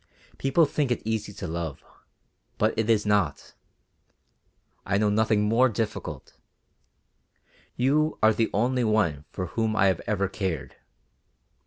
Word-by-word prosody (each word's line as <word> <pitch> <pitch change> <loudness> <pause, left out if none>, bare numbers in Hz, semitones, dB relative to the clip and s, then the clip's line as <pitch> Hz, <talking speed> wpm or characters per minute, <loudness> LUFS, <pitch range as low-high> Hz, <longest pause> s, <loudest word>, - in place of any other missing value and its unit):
People 135 +5 +3
think 145 -1 -1
it 120 - -1
easy 110 -2 -2
to - - -7
love, 80 -3 -5 0.7
but 110 +1 +2
it 110 0 -1
is 110 -2 +3
not; 100 -8 0 1.3
I 100 - 0
know 105 0 +2
nothing 110 0 +2
more 115 +5 +3
difficult. 110 -1 -5 1.4
You 150 +5 +1
are 110 0 +6
the 110 +1 0
only 125 +4 +1
one 100 -10 +1
for 90 - -4
whom 110 -1 0
I 100 - +3
have 95 -3 +2
ever 100 -2 0
cared. 95 -6 -4
110 Hz, 135 wpm, -26 LUFS, 100-115 Hz, 1.4 s, are